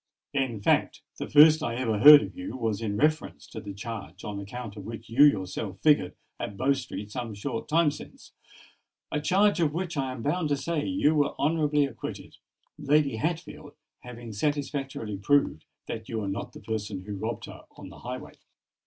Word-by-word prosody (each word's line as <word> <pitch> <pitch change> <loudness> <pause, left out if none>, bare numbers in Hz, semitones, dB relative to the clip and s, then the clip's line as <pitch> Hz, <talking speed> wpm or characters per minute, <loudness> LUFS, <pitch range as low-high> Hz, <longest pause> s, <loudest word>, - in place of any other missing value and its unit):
In 130 -6 -1
fact, - - +1 0.2
the - - -4
first 155 +1 +7
I 120 -6 -2
ever 115 -4 -1
heard 150 +4 +10
of - - -8
you 275 - -6
was 115 -3 -2
in 105 -2 -2
reference 155 +3 0
to 110 - -9
the 100 -1 -7
charge 100 -3 -7
on 105 -1 -5
account 110 +2 -7
of 100 - -8
which 115 +2 -8
you 135 +5 +6
yourself 95 -6 +1
figured 145 -13 +3 0.2
at 100 - -5
Bow 135 +2 +3
Street 120 -6 -6
some 115 -2 -5
short 115 +3 -4
time 160 -1 +4
since,—a 150 0 -11
charge 195 +5 +3
of 155 -3 +2
which, 175 -2 -3
I 135 -2 -1
am 125 -3 -7
bound 155 +1 0
to 145 - +1
say, 150 +2 -2
you 280 - +2
were 145 -2 +1
honourably 150 -1 +2
acquitted, 130 -5 -8 0.4
Lady 145 -4 +2
Hatfield 155 +1 -4 0.3
having 120 -2 -9
satisfactorily 135 -4 -2
proved 120 - +1 0.2
that 110 -1 -6
you 115 - -3
were 105 -2 -2
not 95 - -4
the - - -11
person 105 -4 -4
who 105 +1 -6
robbed - - -4
her - - -12
on - - -10
the - - -13
highway." 125 +1 -7
130 Hz, 185 wpm, -27 LUFS, 110-150 Hz, 0.4 s, heard